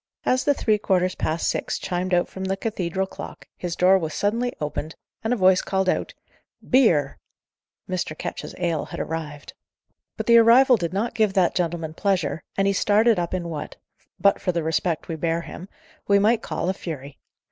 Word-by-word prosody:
As 255 +1 +2
the 285 - +3
three 215 -4 +1
quarters 185 -2 +1
past 160 +2 -2
six - - -1
chimed 180 +1 -3
out 175 0 +2
from 190 0 -6
the 190 0 -1
cathedral 190 -3 -2
clock, - - -10
his 175 -2 -4
door 190 +1 +5
was 160 -3 -4
suddenly 230 +4 0
opened, 150 +1 -4 0.3
and 220 - -1
a - - +3
voice 185 -3 +4
called 190 -1 -1
out, - - -1 0.5
"Beer!" 170 - +3 0.7
Mr. 175 -4 -3
Ketch's - - -6
ale 170 -4 -1
had - - -8
arrived. 150 -3 -5 0.6
But - - -3
the 235 0 +7
arrival 245 +3 +6
did 170 -6 -3
not 205 +5 -2
give 215 -3 +1
that 185 -3 +3
gentleman 165 -3 -2
pleasure, 190 -2 -1 0.2
and 195 - +2
he 200 - +2
started 210 +2 +3
up 170 -1 -2
in 175 -2 -3
what, 155 -3 -6 0.4
but 200 - +3
for 180 - 0
the 170 -2 -2
respect 160 +1 -1
we 165 - -3
bear 165 +1 -1
him, 180 +3 -10 0.4
we 200 - +5
might 220 +3 +3
call - - -3
a 190 - +1
fury. 145 -7 -8
185 Hz, 190 wpm, -23 LUFS, 165-205 Hz, 0.7 s, the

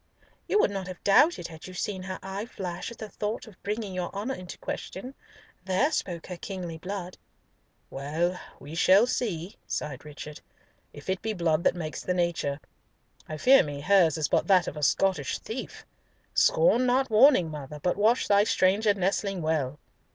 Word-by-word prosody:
"You - - +2
would 205 - +3
not 195 -2 -4
have 185 -1 -9
doubted 205 - +4
had 160 +1 -10
you 185 - -10
seen 190 0 -3
her 185 0 -5
eye 195 +3 -5
flash 180 -5 -5
at 235 - -11
the 220 - -6
thought 210 +1 -4
of 215 -5 -16
bringing 210 -1 -3
your 180 -1 -3
honour 215 +7 -2
into 180 -6 -8
question. 250 +8 -6 0.5
There 190 +11 +1
spoke 175 - -3
her 180 - -7
kingly 175 -3 -6
blood." 185 0 -6 0.7
"Well, 165 +6 -1 0.2
we 145 +3 -10
shall 190 +6 +5
see," 200 -8 -3
sighed 145 -3 -4
Richard, 150 0 -9 0.5
"if 145 - -13
it 190 0 -1
be 220 0 -2
blood 170 -4 +1
that - - +4
makes 155 -3 -5
the 180 - -1
nature. 170 -5 -1 0.7
I 155 - -4
fear 265 - +6
me 145 -4 -5
hers 175 -2 +4
is 155 -3 0
but - - +1
that 185 -4 +5
of - - -4
a 150 - -6
Scottish 150 0 +1
thief! 240 +4 -7 0.5
Scorn - - +4
not 255 0 +2
warning, 215 - +6
mother, 150 0 -7
but 180 +4 0
watch 220 +5 +2
thy 205 0 +5
stranger 205 0 +3
nestling 195 -1 -1
well." 150 -3 0
185 Hz, 180 wpm, -27 LUFS, 160-210 Hz, 0.7 s, fear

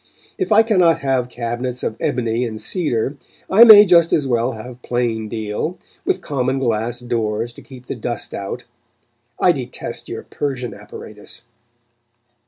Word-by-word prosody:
If 375 - -2
I 220 +1 +7
cannot 185 -7 +3
have 130 -2 0
cabinets 120 +1 -4
of 110 - -2
ebony 115 -1 0
and 110 -3 -4
cedar, 135 - -1 0.3
I 210 +5 +9
may 215 -3 +10
just 170 -3 +5
as 145 - +2
well 120 0 0
have 120 +2 -10
plain 115 -3 -1
deal, 110 - -3 0.3
with 185 - 0
common 135 -4 -1
glass 120 -1 -1
doors 115 -1 -2
to - - -13
keep 130 -3 -13
the - - -4
dust 120 -2 -4
out. 100 +5 -5 0.8
I 180 - +5
detest 130 -7 -5
your - - -5
Persian 125 -6 -4
apparatus. 105 +1 -9
125 Hz, 150 wpm, -20 LUFS, 115-145 Hz, 0.8 s, may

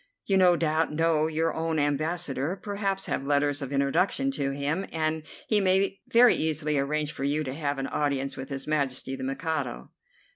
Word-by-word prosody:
You 195 - +1
no 180 -2 +6
doubt 160 -1 +1
know 160 0 +2
your 160 +1 0
own 160 0 -1
Ambassador, 150 +1 -1
perhaps 200 -1 -2
have - - -2
letters 145 0 +1
of 135 -1 -5
introduction 140 - +1
to 140 - -2
him, 145 +7 -2
and 160 0 -1 0.3
he 210 -2 +3
may 195 +1 +2
very 240 +1 +6
easily 155 -1 0
arrange 150 +2 -1
for 135 - -6
you 145 +2 +1
to 130 -2 -4
have 145 -1 -2
an 135 - -2
audience 140 -2 -1
with 135 +1 -7
His 135 -1 -4
Majesty 135 -3 -1
the 130 - -7
Mikado." 135 - -3
155 Hz, 180 wpm, -27 LUFS, 140-165 Hz, 0.3 s, no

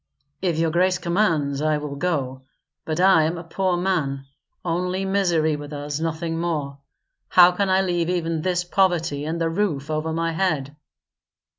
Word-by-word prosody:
"If 175 -4 0
your 165 0 +1
grace 180 +2 +2
commands 165 -7 0
I 155 0 +2
will 150 -1 -5
go, 140 -5 -2 0.4
but 160 +1 -2
I 185 -4 +5
am 165 +2 -1
a 170 - -7
poor 180 +2 -1
man. 155 -7 -1 0.4
Only 180 +3 -1
misery 175 -6 +1
with 145 0 -8
us; 145 0 -4
nothing 165 0 -2
more. 150 -5 -3 0.5
How 180 0 +7
can 195 +2 -1
I 190 +1 +3
leave 175 -2 0
even 165 -3 -1
this 180 0 0
poverty 175 -6 +1
and 165 +2 -3
the 165 - +1
roof 160 -6 -1
over 155 +1 -1
my 165 +1 -1
head?" 155 -5 -1
165 Hz, 165 wpm, -23 LUFS, 150-180 Hz, 0.5 s, How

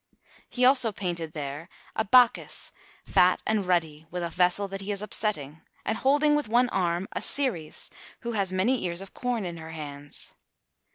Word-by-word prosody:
He 250 0 +2
also 255 -3 +5
painted 170 -5 -4
there 145 +3 -5 0.3
a 220 - +1
Bacchus, 245 +2 +3 0.3
fat 180 0 +4
and 215 -4 0
ruddy, 160 -3 0
with 180 +1 -4
a 170 - -3
vessel 180 +3 +2
that 195 0 -6
he 200 +2 -4
is 200 0 -3
upsetting, 160 -9 -3 0.2
and 220 - -1
holding 295 +2 +4
with 295 -7 -1
one 245 +2 +4
arm 175 -1 0
a - - -3
Ceres 230 - 0 0.3
who 235 - -3
has 200 -4 0
many 215 +8 +1
ears 175 0 -1
of 195 - -10
corn 245 -5 -2
in 170 -1 -5
her 160 0 -9
hands. 145 -2 -8
190 Hz, 175 wpm, -27 LUFS, 165-230 Hz, 0.3 s, also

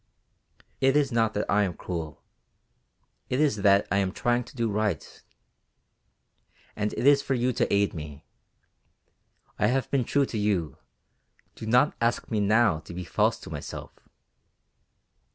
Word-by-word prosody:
"It 135 +2 +3
is 140 -2 +1
not 115 -2 +1
that 105 - 0
I 105 - +3
am 95 -4 -1
cruel, 80 -4 -6 1.1
it 125 - 0
is 145 -8 +2
that 100 0 +4
I 100 - +2
am 95 -2 +1
trying 120 +4 0
to 130 - -15
do 115 -2 0
right. 105 -6 -2 1.5
And 105 0 -1
it - - -3
is 140 0 +6
for 135 - -1
you 125 +1 0
to - - 0
aid 100 0 +2
me. 75 -2 -8 1.3
I 105 - +3
have 130 +3 0
been 135 -3 +2
true 140 +3 +2
to 110 - -4
you, 100 -7 -1 0.8
do 110 - -8
not 125 +6 +3
ask 120 +1 0
me 110 - +1
now 105 -3 +3
to 85 - -11
be 90 - -4
false 85 - +1
to - - -10
myself." - - -7
110 Hz, 155 wpm, -27 LUFS, 100-125 Hz, 1.5 s, is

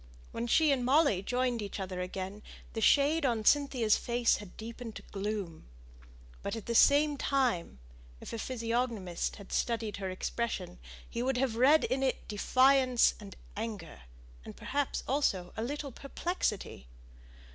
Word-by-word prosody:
When 235 - -3
she 310 +5 +4
and 265 -3 +1
Molly 265 - +3
joined 245 +2 -1
each 205 0 -5
other 185 -1 -4
again, 190 +3 -5 0.3
the 225 - -3
shade 290 +7 +4
on 230 -5 0
Cynthia's 260 -6 +3
face 240 -1 +1
had 205 -3 -11
deepened 230 0 -8
to - - -8
gloom. 195 - -4 0.7
But, - - -3
at 225 - -7
the 235 - -2
same 290 +4 +5
time, 250 - 0 0.4
if - - -9
a 230 - -4
physiognomist 230 -6 -2
had 200 -2 -12
studied 225 -4 -1
her 195 -1 -4
expression, 185 -1 -3 0.3
he 235 - -4
would 260 +1 0
have 255 -3 0
read 275 +6 +5
in 265 +1 0
it 265 -1 -1
defiance 255 +3 +4
and 200 -2 -10 0.2
anger, 205 - -6 0.4
and - - -10
perhaps 285 0 -2
also 195 -10 0
a - - -3
little 280 +3 -4
perplexity. 260 - -3
235 Hz, 150 wpm, -31 LUFS, 205-265 Hz, 0.7 s, same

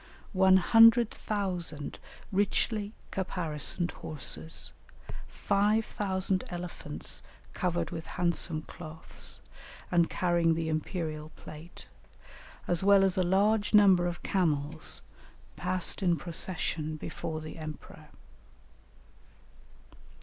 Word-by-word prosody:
One 190 0 +6
hundred 225 +4 +6
thousand 180 -8 -3 0.3
richly 205 +2 0 0.2
caparisoned 175 -2 -2
horses, 155 +2 -1 0.6
five 210 +2 +1
thousand 190 -2 -1
elephants 175 0 -6 0.3
covered 175 -3 -1
with 165 -2 -6
handsome 170 -3 +1
cloths 160 0 -6 0.5
and 170 -1 +3
carrying 170 -2 +2
the 160 0 -2
imperial 155 -1 -3
plate, 155 +3 -11 0.8
as 175 +1 +1
well 200 0 +6
as 190 -1 +2
a 190 - +2
large 205 +4 +2
number 190 -4 +6
of 175 0 -5
camels, 155 -4 0 0.5
passed 180 +4 0
in 175 -3 +2
procession 165 -2 -2
before 155 +1 -5
the 155 +1 -8
emperor. 155 -1 -9
175 Hz, 95 wpm, -30 LUFS, 160-195 Hz, 0.8 s, One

